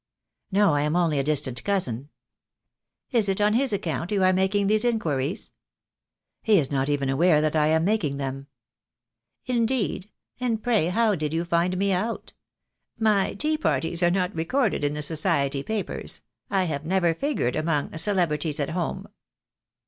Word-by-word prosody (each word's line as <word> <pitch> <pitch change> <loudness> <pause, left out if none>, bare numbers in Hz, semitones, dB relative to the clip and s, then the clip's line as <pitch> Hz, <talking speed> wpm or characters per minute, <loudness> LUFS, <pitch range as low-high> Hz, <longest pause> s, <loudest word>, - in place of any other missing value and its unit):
"No, 200 -3 +3
I 145 - +1
am 150 +2 0
only 165 -5 +2
a - - +1
distant 135 -4 0
cousin." 145 - -1 1.0
"Is 225 -6 +2
it 195 - 0
on 210 0 +3
his 260 +2 +2
account 175 -3 -2
you 200 -2 +1
are 185 0 +4
making 190 +2 +1
these 215 +2 +2
inquiries?" 165 - -1 0.9
"He 215 -2 +4
is 145 -5 0
not 135 0 0
even 140 -2 0
aware 150 +4 +3
that 155 0 0
I 150 -1 +3
am 160 +1 +2
making 180 -9 0
them." 135 0 -5 1.0
"Indeed, 235 -5 -1 0.3
and 230 -3 -1
pray 225 -9 +2
how 220 +4 +2
did 155 -3 -2
you 170 +1 -1
find 175 +2 +1
me 200 +1 +1
out? 215 +6 -3 0.6
My 215 -3 +1
tea 305 +7 0
parties 170 - -1
are 175 - +4
not 180 0 0
recorded 175 - 0
in 145 0 0
the 150 - -3
Society 145 -3 0
papers, 215 +6 -4 0.3
I 195 -2 +1
have 150 -5 -3
never 175 0 +1
figured 265 - -1
among 155 -1 -1
'Celebrities 160 -5 +1
at 145 +1 -2
Home.' 175 0 -3
175 Hz, 165 wpm, -25 LUFS, 150-205 Hz, 1.0 s, are